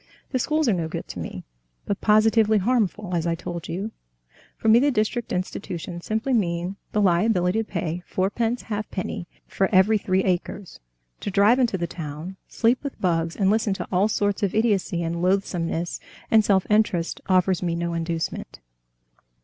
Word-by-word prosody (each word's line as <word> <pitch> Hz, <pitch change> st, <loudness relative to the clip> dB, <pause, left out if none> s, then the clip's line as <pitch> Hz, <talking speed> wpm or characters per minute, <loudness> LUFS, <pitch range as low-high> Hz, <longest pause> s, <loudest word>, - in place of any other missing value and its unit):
The 255 Hz, -, 0 dB
schools 305 Hz, +3 st, +1 dB
are 225 Hz, -, +4 dB
no 170 Hz, -3 st, -1 dB
good -, -, -5 dB
to -, -, -6 dB
me, -, -, -6 dB, 0.4 s
but 200 Hz, -, -2 dB
positively 215 Hz, 0 st, +4 dB
harmful, 210 Hz, -3 st, 0 dB
as 170 Hz, -1 st, 0 dB
I 165 Hz, -, +1 dB
told 170 Hz, 0 st, -6 dB
you. 195 Hz, +6 st, -3 dB, 0.7 s
For -, -, -3 dB
me 225 Hz, +2 st, +7 dB
the 285 Hz, +3 st, +3 dB
district 235 Hz, -1 st, -1 dB
institutions 175 Hz, -1 st, -4 dB
simply 220 Hz, +5 st, 0 dB
mean 175 Hz, -3 st, 0 dB, 0.2 s
the 210 Hz, -, +1 dB
liability 180 Hz, +1 st, +2 dB
to -, -, +1 dB
pay 170 Hz, -2 st, -3 dB
fourpence 225 Hz, +5 st, -1 dB
halfpenny 205 Hz, -5 st, -4 dB, 0.2 s
for 195 Hz, -, 0 dB
every 205 Hz, +2 st, +5 dB
three 190 Hz, -1 st, +1 dB
acres, 185 Hz, +1 st, -2 dB, 0.4 s
to -, -, -4 dB
drive 205 Hz, +6 st, +4 dB
into 235 Hz, -6 st, +2 dB
the 170 Hz, -, -1 dB
town, 160 Hz, +2 st, -7 dB
sleep 235 Hz, +4 st, +1 dB
with 280 Hz, -, -6 dB
bugs, 165 Hz, -2 st, 0 dB
and 195 Hz, -1 st, +2 dB
listen 215 Hz, -2 st, +1 dB
to -, -, -5 dB
all 190 Hz, +2 st, +3 dB
sorts 205 Hz, -2 st, 0 dB
of 200 Hz, -1 st, 0 dB
idiocy 205 Hz, -6 st, +1 dB
and 170 Hz, +1 st, -2 dB
loathsomeness, 175 Hz, -2 st, 0 dB, 0.3 s
and 220 Hz, -1 st, +6 dB
self 195 Hz, -3 st, +3 dB
interest 210 Hz, -6 st, +1 dB
offers 185 Hz, -1 st, +3 dB
me 170 Hz, -2 st, -1 dB
no 170 Hz, 0 st, -2 dB
inducement." 165 Hz, 0 st, -3 dB
195 Hz, 170 wpm, -24 LUFS, 175-220 Hz, 0.7 s, me